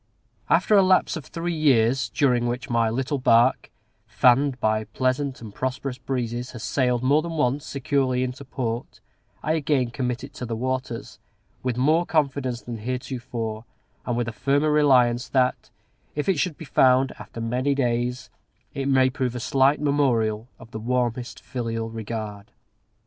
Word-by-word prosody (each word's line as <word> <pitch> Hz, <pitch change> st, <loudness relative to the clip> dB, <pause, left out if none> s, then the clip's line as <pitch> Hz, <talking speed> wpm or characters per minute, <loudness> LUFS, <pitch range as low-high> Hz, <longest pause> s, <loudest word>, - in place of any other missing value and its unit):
After 180 Hz, +5 st, +3 dB
a 200 Hz, -, +7 dB
lapse 185 Hz, -1 st, +3 dB
of 155 Hz, -5 st, -6 dB
three 170 Hz, +1 st, -3 dB
years, 130 Hz, -5 st, +3 dB
during 120 Hz, +1 st, +2 dB
which 120 Hz, +1 st, -4 dB
my 115 Hz, -1 st, +2 dB
little 135 Hz, +5 st, -1 dB
bark, 120 Hz, 0 st, +3 dB, 0.4 s
fanned 130 Hz, +1 st, +3 dB
by 110 Hz, -1 st, +1 dB
pleasant 130 Hz, +5 st, -1 dB
and 105 Hz, -3 st, -9 dB
prosperous 130 Hz, +1 st, -3 dB
breezes, 125 Hz, -2 st, -3 dB
has 120 Hz, -, -8 dB
sailed, 125 Hz, -3 st, 0 dB
more 145 Hz, +4 st, +4 dB
than 170 Hz, +1 st, -5 dB
once, 140 Hz, -2 st, 0 dB
securely 135 Hz, -3 st, 0 dB
into 130 Hz, +2 st, -5 dB
port, 120 Hz, -3 st, -4 dB, 0.4 s
I 155 Hz, -, 0 dB
again 140 Hz, -6 st, +1 dB
commit 125 Hz, -1 st, -3 dB
it 135 Hz, -, -9 dB
to 125 Hz, -, -6 dB
the 115 Hz, -, -3 dB
waters, 130 Hz, 0 st, -4 dB, 0.4 s
with 125 Hz, -2 st, -2 dB
more 155 Hz, +7 st, +3 dB
confidence 135 Hz, -5 st, 0 dB
than 120 Hz, -2 st, -6 dB
heretofore, 120 Hz, -2 st, -4 dB, 0.4 s
and 120 Hz, -1 st, -2 dB
with 120 Hz, -1 st, -1 dB
a -, -, -2 dB
firmer 145 Hz, +6 st, +1 dB
reliance 130 Hz, -5 st, +4 dB
that, 130 Hz, -2 st, +1 dB, 0.5 s
if 150 Hz, -, -2 dB
it 190 Hz, -6 st, +2 dB
should 170 Hz, -3 st, -1 dB
be 160 Hz, -, -9 dB
found 130 Hz, -1 st, +4 dB
"after -, -, -9 dB
many 125 Hz, +5 st, 0 dB
days," 125 Hz, 0 st, -1 dB, 0.4 s
it 140 Hz, -1 st, -3 dB
may 130 Hz, -1 st, +4 dB
prove 125 Hz, -2 st, -2 dB
a -, -, -3 dB
slight 135 Hz, +3 st, +3 dB
memorial 125 Hz, -6 st, +1 dB
of 115 Hz, -, -15 dB
the 110 Hz, -, -5 dB
warmest 120 Hz, +1 st, -2 dB
filial 115 Hz, -3 st, -4 dB
regard. 110 Hz, -2 st, -6 dB
125 Hz, 160 wpm, -24 LUFS, 120-140 Hz, 0.5 s, a